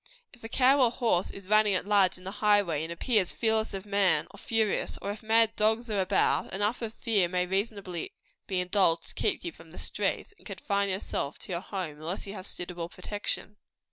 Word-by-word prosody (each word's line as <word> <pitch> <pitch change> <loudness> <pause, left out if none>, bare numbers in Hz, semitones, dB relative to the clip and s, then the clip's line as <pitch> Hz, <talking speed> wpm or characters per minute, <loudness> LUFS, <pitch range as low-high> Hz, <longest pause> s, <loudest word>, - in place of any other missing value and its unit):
If 240 - -18
a 225 - -6
cow 265 +3 +4
or 240 - +5
horse 230 -7 0
is 195 -1 -10
running 215 -1 +4
at 185 - -1
large 200 -3 +4
in 180 - -15
the 190 - -5
highway, 205 -7 +2
and 165 - -5
appears 200 +1 +1
fearless 220 -2 +1
of 195 +1 -6
man, 200 -4 +3
or - - -13
furious, 220 -2 0
or 200 - -3
if 205 - -8
mad 225 0 +3
dogs 220 +2 +1
are 200 -2 +1
about, 190 +1 +1
enough 205 +5 0
of 225 0 -4
fear 210 -6 +2
may 180 0 0
reasonably 195 -2 -3 0.4
be 190 -2 0
indulged 180 -2 +2
to - - -12
keep - - -1
you 170 - -3
from 165 0 -16
the 170 - -13
streets, - - -2
and - - -13
confine 200 0 -1
you 190 - 0
to 145 -6 -3 0.2
your 175 -1 -2
home, 185 -7 -5
unless 165 +5 -4
you 200 - -7
have 195 -2 -6
suitable 175 -1 -4
protection. 205 +1 -5
200 Hz, 210 wpm, -29 LUFS, 180-215 Hz, 0.4 s, or